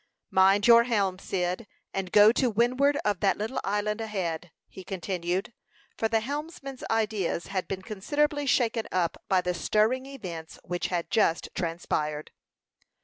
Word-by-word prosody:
"Mind 195 +2 +5
your 235 0 +7
helm, 200 -6 0
Cyd, 185 +3 -2 0.3
and 190 -2 -3
go 210 +1 +8
to 250 +1 +1
windward 255 +6 +2
of 205 -3 +1
that 195 - +2
little 220 +5 -3
island 210 +2 -1
ahead," 180 -6 -3 0.2
he 190 - -11
continued; 185 +2 -3 0.4
for 225 - 0
the 225 0 +1
helmsman's 280 0 -6
ideas 215 -6 0
had 185 -2 -1
been 190 -1 -4
considerably 290 +9 -1
shaken 230 -3 +1
up 175 -3 -1
by 190 -1 +3
the 180 0 -1
stirring 220 +9 +1
events 175 -12 -8
which 175 0 -2
had 175 -2 -3
just 185 -7 +2
transpired. 155 -3 -2
205 Hz, 145 wpm, -27 LUFS, 180-235 Hz, 0.4 s, go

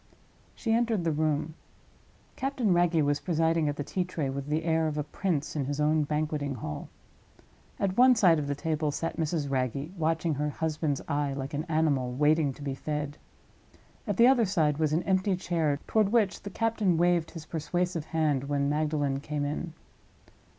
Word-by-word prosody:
She 225 -3 -1
entered 230 -5 +1
the 165 - +1
room. 155 0 0 0.8
Captain 260 -7 0
Wragge 175 -2 +3
was 145 0 +1
presiding 165 -2 +1
at 145 - -2
the 145 - -3
tea 185 +5 -1
tray 160 -6 -3
with 140 +1 -5
the 155 +2 0
air 160 -1 +1
of 150 -1 -3
a 150 - 0
prince 155 -1 -2
in 145 -3 -1
his 145 +2 -3
own 150 0 +2
banqueting 150 -2 -2
hall. 75 -10 -6 0.9
At 190 -1 0
one 255 0 +7
side 175 -7 +5
of 145 - -3
the 145 - -1
table 155 0 -1
sat 155 +3 -3
Mrs. 160 -2 -1
Wragge, 135 +4 -1
watching 165 -1 0
her 150 +1 -1
husband's 155 -2 -2
eye 145 -1 0
like 135 +1 -5
an 150 +3 -2
animal 155 -6 +1
waiting 150 +2 +3
to 145 - -11
be 140 -1 -2
fed. 150 +1 -4 0.9
At 205 -3 -1
the 235 - +7
other 250 -3 +5
side 155 -6 +1
was 155 -2 +1
an 160 +3 +1
empty 190 0 +1
chair, 165 -5 0
toward 215 -3 +2
which 220 -5 +2
the 200 - -6
captain 215 -4 +1
waved 175 -1 +2
his 165 -2 -9
persuasive 175 +1 -2
hand 150 -5 0
when 140 0 0
Magdalen 145 -2 0
came 145 0 -3
in. 150 +4 -3
155 Hz, 185 wpm, -28 LUFS, 145-175 Hz, 0.9 s, one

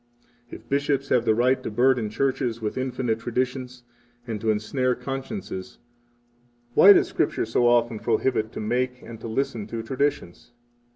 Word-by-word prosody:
49 120 - -10
If - - -30
bishops 140 0 0
have 120 -2 +2
the 110 - +3
right 125 +3 +2
to - - -4
burden 120 0 +2
churches 125 0 -1
with 105 -2 -3
infinite 130 -3 -2
traditions, 125 +1 -3 0.4
and 110 -4 -5
to 110 - 0
ensnare 125 +4 0
consciences, 135 - -6 1.0
why 200 - +9
does - - +5
Scripture 145 - -1
so 120 +2 +2
often 120 -2 +2
prohibit 115 -1 0
to - - -6
make, 125 +3 -2
and 115 -1 -10
to - - -6
listen 110 -2 -2
to, 115 0 -5
traditions? 130 -5 -3
120 Hz, 160 wpm, -25 LUFS, 110-130 Hz, 1.0 s, why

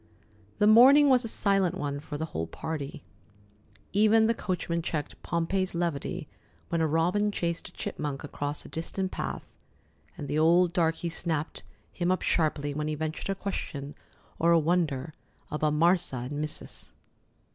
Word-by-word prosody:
The 210 - +3
morning 265 +7 +8
was 255 -1 +5
a - - -3
silent 195 -4 +2
one 145 -5 -3
for 150 0 -6
the 160 - -2
whole 80 +1 -2
party. 145 - -5 0.9
Even 215 +2 +5
the 230 - +3
coachman 175 -5 -2
checked 155 -3 -4
Pompey's 175 +3 -1
levity 170 -5 -2 0.4
when 165 -1 0
a 160 - +3
robin 180 +7 +2
chased 170 -4 -2
a - - -20
chipmunk 145 -1 -4
across 145 0 -4
a - - -8
distant 185 +3 -3
path, - - -5 0.6
and 145 -4 -6
the 145 +2 0
old 170 +2 +4
darkey 165 0 0
snapped 160 -2 -3 0.3
him 175 0 -1
up 185 - 0
sharply 150 -3 +1
when 150 +1 -2
he 155 - -1
ventured 155 +4 -4
a 195 - 0
question 145 -8 -5 0.5
or 170 +1 +4
a 170 - +6
wonder 160 -3 0 0.4
about 150 0 +1
"Marsa" 170 -1 +3
and 135 +4 -4
"Missus." 150 0 -7
165 Hz, 155 wpm, -28 LUFS, 150-185 Hz, 0.9 s, morning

